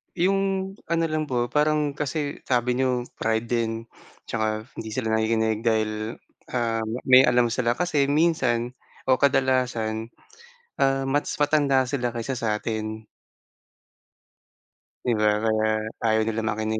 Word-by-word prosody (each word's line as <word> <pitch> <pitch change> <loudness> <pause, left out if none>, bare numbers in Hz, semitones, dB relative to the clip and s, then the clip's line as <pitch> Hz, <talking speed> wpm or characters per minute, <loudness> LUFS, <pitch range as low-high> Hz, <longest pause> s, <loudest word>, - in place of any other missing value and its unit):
Yung 195 +1 0
ano 165 0 0
lang 155 0 -1
po, 120 -4 -1
parang 150 +1 +1
kasi 145 0 -2
sabi 125 -1 +1
n'yo 130 -1 +1 0.2
pride 110 +1 -1
din 115 -2 0 0.2
at - - -23
tsaka 110 -1 0 0.3
hindi 110 -1 -6
sila 115 -4 -2
nakikinig 110 0 +1
dahil, 110 0 -1 0.3
ah, 115 -2 0 0.2
may 130 0 +7
alam 120 -1 +3
sila 120 0 +1
kasi 155 -3 +1
minsan 140 -5 +1 0.3
o 130 - +5
kadalasan, 125 -5 +1 0.6
ah, 135 0 +1
mas 145 +2 0
matanda 140 -4 +3
sila 125 -3 -1
kaysa 120 +3 -3
sa 110 -3 -1
atin. 110 -1 -4 2.0
'Di 125 - +1
ba, 105 0 +3
kaya 110 -1 +1 0.2
ayaw 110 -1 +2
nila 115 0 -1
makinig. 110 0 -1
120 Hz, 130 wpm, -25 LUFS, 110-140 Hz, 2.0 s, may